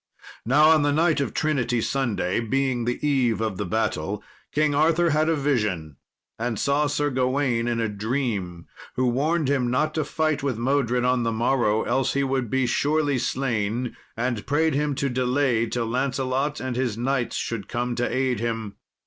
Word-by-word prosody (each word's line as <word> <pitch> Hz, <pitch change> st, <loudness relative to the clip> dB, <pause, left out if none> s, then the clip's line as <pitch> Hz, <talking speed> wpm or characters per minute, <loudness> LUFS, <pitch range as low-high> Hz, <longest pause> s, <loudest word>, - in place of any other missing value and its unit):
Now, 150 Hz, +5 st, +6 dB
on 155 Hz, -1 st, +5 dB
the 145 Hz, 0 st, +2 dB
night 155 Hz, +1 st, +2 dB
of 140 Hz, -, -2 dB
Trinity 125 Hz, -6 st, 0 dB
Sunday, 115 Hz, -7 st, -1 dB
being 125 Hz, +1 st, 0 dB
the 120 Hz, 0 st, -1 dB
eve 125 Hz, -6 st, +2 dB
of 110 Hz, -4 st, -2 dB
the -, -, -3 dB
battle, 100 Hz, -2 st, -1 dB, 0.3 s
King 150 Hz, 0 st, +2 dB
Arthur 165 Hz, +3 st, +3 dB
had 155 Hz, +2 st, +2 dB
a 165 Hz, -, +3 dB
vision, 105 Hz, -, -1 dB, 0.4 s
and 115 Hz, -1 st, -2 dB
saw 145 Hz, +4 st, +1 dB
Sir 145 Hz, 0 st, 0 dB
Gawain 130 Hz, -2 st, 0 dB
in 120 Hz, -1 st, 0 dB
a 115 Hz, -, +1 dB
dream, 105 Hz, -5 st, -3 dB, 0.3 s
who 130 Hz, -, +1 dB
warned 145 Hz, +5 st, +1 dB
him 130 Hz, -3 st, +1 dB
not 140 Hz, +5 st, +1 dB
to 155 Hz, -, 0 dB
fight 155 Hz, -1 st, -1 dB
with 135 Hz, -5 st, -1 dB
Modred 125 Hz, -1 st, +1 dB
on 125 Hz, 0 st, +2 dB
the 115 Hz, -1 st, 0 dB
morrow, 115 Hz, -1 st, +1 dB
else 135 Hz, +2 st, 0 dB
he 140 Hz, -, +1 dB
would 130 Hz, -3 st, -1 dB
be 130 Hz, +1 st, +1 dB
surely 145 Hz, +1 st, +1 dB
slain; 120 Hz, -2 st, -1 dB, 0.2 s
and 120 Hz, -2 st, -2 dB
prayed 160 Hz, +2 st, +2 dB
him 145 Hz, 0 st, 0 dB
to 140 Hz, -, -1 dB
delay 125 Hz, -2 st, +1 dB
till 120 Hz, +1 st, -2 dB
Lancelot 135 Hz, +3 st, -1 dB
and 130 Hz, -2 st, -3 dB
his 125 Hz, -4 st, -1 dB
knights 125 Hz, 0 st, -1 dB
should 115 Hz, -4 st, -3 dB
come 120 Hz, +1 st, -2 dB
to 120 Hz, +1 st, -1 dB
aid 130 Hz, -3 st, 0 dB
him. 115 Hz, -3 st, -3 dB
130 Hz, 180 wpm, -24 LUFS, 115-140 Hz, 0.4 s, Now